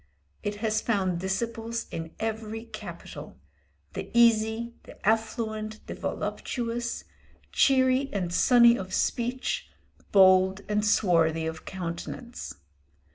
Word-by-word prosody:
It 205 0 -3
has 215 0 +1
found 190 -6 0
disciples 230 +4 -2
in 165 0 -6
every 220 0 -3
capital 190 - -9 0.6
the - - -5
easy, 230 0 +4
the - - -14
affluent, 220 -1 -1
the - - -6
voluptuous, 235 -1 -3 0.5
cheery 260 0 +3
and 180 -4 -2
sunny 235 +3 +6
of 185 -1 -4
speech, 245 +2 -1 0.4
bold 190 0 +6
and 210 0 +1
swarthy 165 -6 +3
of 160 0 -5
countenance. 190 +7 -6
215 Hz, 105 wpm, -27 LUFS, 190-235 Hz, 0.6 s, sunny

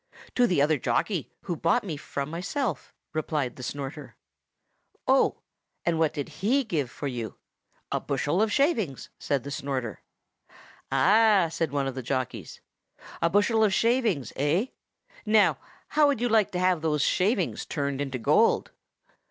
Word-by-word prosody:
"To 245 -1 +4
the 170 -9 +3
other 150 -1 +2
jockey, 175 - -1
who 175 - -3
bought 170 +9 +2
me 175 -7 -4
from 140 0 -5
myself," 180 - -3 0.2
replied 150 -4 -2
the - - -10
Snorter. 140 +2 -6 0.9
"Oh! - - +3 0.4
and 165 -2 +1
what 160 -2 +3
did 145 - -4
he 260 +8 +3
give 155 - -2
for 145 - -7
you?" 120 -4 -4 0.6
"A - - +1
bushel 145 +7 0
of 220 -1 +2
shavings," 225 - 0
said 140 -4 -1
the 140 - -6
Snorter. 130 -6 -3 0.9
"Ah!" 195 +5 +5
said 165 -3 -1
one 140 -1 0
of 135 - -2
the 130 - -5
jockeys. 130 0 -4 0.6
"A 170 - +3
bushel 205 +4 +3
of 205 -3 +3
shavings, 225 - +1
eh? 165 - +1 0.5
Now, 215 -1 +4 0.3
how 300 -1 +4
would 280 -5 +1
you 245 0 0
like 220 -3 +3
to 180 - -1
have 180 -3 +2
those 150 -2 +1
shavings 195 -1 +1
turned 140 -2 -2
into 135 -2 -3
gold?" 115 - +3
165 Hz, 155 wpm, -27 LUFS, 140-215 Hz, 0.9 s, Ah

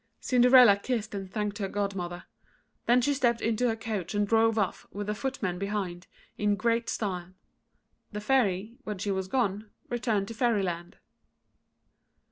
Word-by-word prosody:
Cinderella 250 -4 +6
kissed 215 0 -3
and 195 -2 -5
thanked 210 0 -2
her 195 - -1
godmother. 190 -3 -3 0.6
Then 245 +1 +5
she 285 +4 +2
stepped 240 -4 +2
into 230 +2 +1
her 225 - +1
coach 215 -6 -4
and 205 0 +1
drove 225 +1 +3
off, 200 -4 -1
with 205 0 -5
her - - +1
footmen 210 -7 -3
behind, 195 -3 -3 0.3
in 205 0 +2
great 230 +1 0
style. 185 -3 -3 0.8
The 210 - -4
Fairy, 215 -2 +1
when 210 -4 -4
she 200 +2 -2
was 190 -1 -2
gone, 210 -2 -1 0.2
returned 225 -5 0
to - - -5
Fairyland. 195 -8 -1
210 Hz, 150 wpm, -28 LUFS, 195-235 Hz, 0.8 s, Cinderella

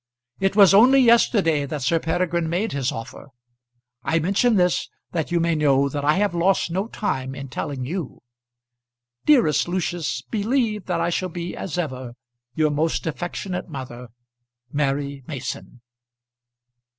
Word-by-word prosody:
It 195 0 +1
was 200 -2 +7
only 250 +7 +7
yesterday 205 - +4
that 145 -2 -4
Sir 165 +6 +2
Peregrine 170 0 -1
made 190 +7 -1
his 135 -2 -1
offer. 115 +4 -8 0.8
I 160 - +1
mention 200 +8 +2
this 180 -2 +1 0.2
that 165 -1 -2
you 175 - +2
may 170 0 +1
know 140 -3 +3
that 145 +1 -4
I 150 +1 +3
have 205 -1 +1
lost 175 0 +1
no 190 +5 -1
time 135 - -3
in 140 -1 -7
telling 130 +1 -4
you. 165 0 -4 1.1
Dearest 175 - +4
Lucius, 175 -7 -2
believe 220 -1 -1
that 175 -2 0
I - - 0
shall 185 +2 -1
be 175 0 -5
as 175 -3 -5
ever 130 -7 -4 0.4
Your 155 -1 +2
most 155 +3 -1
affectionate 175 +3 -4
mother, 125 -4 -7 0.6
MARY 140 -1 -1
MASON. 130 -3 -6
165 Hz, 145 wpm, -23 LUFS, 140-190 Hz, 1.1 s, was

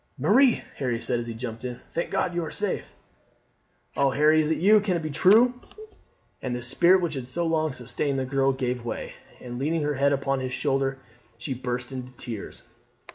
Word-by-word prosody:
"Marie," 230 - +4
Harry 125 -4 -1
said 120 0 +1
as 120 - -5
he 115 - -4
jumped 115 -1 -6
in, 125 -1 -5
"thank 170 - -2
God 180 - 0
you 175 0 -1
are 160 - -4
safe!" 205 +4 -3 1.0
"Oh, 140 -1 +3
Harry, 150 +3 +4
is 155 - -1
it 160 - +1
you? 210 +5 +6
Can 195 -4 0
it 165 - -5
be 155 - -3
true?" 220 - +5 0.9
And 125 -2 -3
the 120 - -5
spirit 175 +9 +4
which 165 -3 -1
had 130 -3 -5
so 170 +6 -2
long 160 -1 +1
sustained 125 +3 -2
the 130 - -1
girl 135 +1 +2
gave 125 -2 -2
way, 120 - -5 0.3
and 120 -1 -7
leaning 155 +3 0
her 150 0 0
head 140 +1 +2
upon 135 -1 0
his 130 -1 -4
shoulder 135 -1 0 0.4
she 130 +3 -4
burst 125 0 -4
into 130 -1 -7
tears. 115 -4 -8
135 Hz, 200 wpm, -26 LUFS, 125-160 Hz, 1.0 s, you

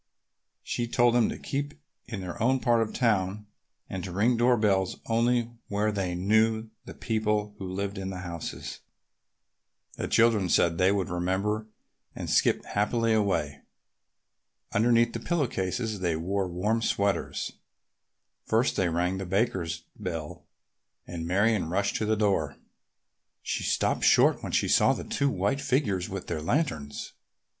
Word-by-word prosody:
She 120 - -2
told 120 0 +3
them 120 -2 +3
to - - -4
keep 145 +1 -4 0.3
in 110 -5 -5
their 90 +5 -6
own 130 +3 +3
part 120 -2 +3
of 110 - -1
town 105 -4 0 0.4
and 95 -2 -5
to 95 - -5
ring 110 +7 +2
door 120 +1 +4
bells 95 -3 +1
only 120 +1 +1 0.2
where 105 +1 0
they 95 -4 -2
knew 110 +4 +2
the - - -9
people 105 -2 -1
who 95 -2 -5
lived 100 +1 -3
in 95 0 -4
the 90 -1 -5
houses. 85 -3 -6 1.2
The - - -2
children 115 -5 +3
said 85 -1 +3
they 95 +1 +5
would 100 -3 0
remember 95 +5 -1 0.5
and - - -4
skipped - - +3
happily 115 +2 +1
away. 95 -9 0 1.1
Underneath 115 +1 +3
the 115 - -3
pillow 160 +4 0
cases 110 +1 -2
they 85 -3 0
wore 95 +4 -1
warm 105 +6 0
sweaters. 100 -3 -1 0.8
First 115 +3 +1
they 90 -2 +2
rang 90 +3 0
the 95 - -4
Bakers' 90 -5 -1
bell 80 -4 -6 0.6
and 85 -2 -5
Marion 100 0 +2
rushed 100 +3 0
to 110 - -1
the 110 - +2
door. 95 -9 +1 0.9
She - - -2
stopped - - 0
short - - +5
when - - -5
she - - +2
saw - - +4
the - - -5
two 140 - 0
white 105 +5 0
figures 105 -10 0
with - - -5
their 75 - -3
lanterns. 80 - -2
105 Hz, 150 wpm, -28 LUFS, 90-115 Hz, 1.2 s, they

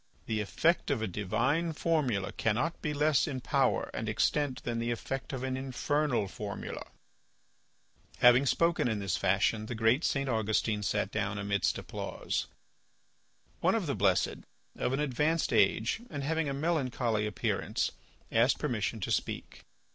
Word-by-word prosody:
The 110 -1 -1
effect 165 - +1
of 130 -6 0
a - - 0
divine 130 - 0
formula 140 - 0
cannot 125 +10 -1
be 150 - -1
less 150 +1 +2
in 135 -4 -3
power 125 - +1
and - - -3
extent 145 -3 0
than 115 -1 -2
the 115 +1 -1
effect 130 +3 -3
of 130 -2 -4
an 130 0 -1
infernal 135 -2 0
formula." 100 +1 -6 1.3
Having 125 +3 +6
spoken 170 0 +2
in 110 -3 0
this 95 -5 -1
fashion 100 +4 +1
the 120 - -4
great 115 +7 +3
St. 140 -1 0
Augustine 110 -2 0
sat 100 - -1
down 100 +1 -1
amidst 100 0 0
applause. - - -4 1.1
One 185 +4 +3
of 220 -5 0
the 140 - -1
blessed, 95 -2 +2 0.4
of - - -1
an 135 - 0
advanced 150 +2 +1
age 110 - +3
and 145 -3 -4
having 160 +1 0
a - - -1
melancholy 130 -8 0
appearance, 105 - -1 0.4
asked 115 +4 +4
permission 115 -5 -2
to - - -2
speak. - - -3
125 Hz, 150 wpm, -31 LUFS, 105-150 Hz, 1.3 s, Having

